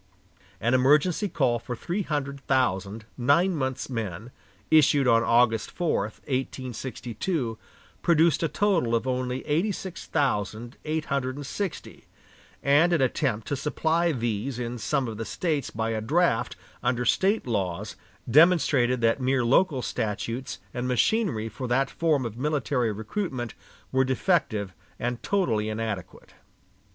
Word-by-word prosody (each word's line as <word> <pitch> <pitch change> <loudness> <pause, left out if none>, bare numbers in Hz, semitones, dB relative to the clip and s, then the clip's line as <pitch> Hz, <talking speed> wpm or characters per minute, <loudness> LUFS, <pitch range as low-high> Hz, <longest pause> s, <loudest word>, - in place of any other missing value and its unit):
An 120 +3 +1
emergency 150 +10 +3
call 125 -8 +1
for 120 +2 -5
three 175 - -3
hundred 140 -5 -3
thousand 110 -5 0
nine 170 +9 +3
months' 130 -3 -2
men, 115 -3 -5 0.4
issued 145 -3 +5
on 115 -1 +5
August 115 -2 +3
4, 175 -2 0
1862, 130 - -4 0.4
produced 165 -2 +3
a 165 - +2
total 170 - +1
of 115 - 0
only 130 0 -2
eighty 165 +8 +1
six 190 -2 -7
thousand 120 -4 -1
eight 155 0 -1
hundred 130 -2 -1
and 145 0 -7
sixty; 190 +5 -5 0.6
and 150 +5 +4
an 170 - +3
attempt 125 -4 0
to 145 - -1
supply 160 +4 +1
these 120 -1 -2
in 120 0 -4
some 135 +2 0
of 110 -2 -5
the 115 - -3
States 150 - -2
by 110 +1 -2
a 110 -1 -2
draft 150 +1 +1 0.3
under 125 0 0
State 195 - +2
laws 100 -3 -2 0.3
demonstrated 135 -4 +4
that 115 +3 +2
mere 130 -1 +1
local 135 +1 +3
statutes 115 +3 -3 0.2
and 125 +1 -2
machinery 125 - +1
for 115 +4 -6
that 135 +3 +1
form 155 -6 +1
of 115 0 -6
military 135 -5 0
recruitment 120 - -4 0.4
were 130 0 +3
defective 130 - 0 0.2
and 120 0 -3
totally 115 - 0
inadequate. 110 -4 -5
130 Hz, 140 wpm, -26 LUFS, 115-155 Hz, 0.6 s, issued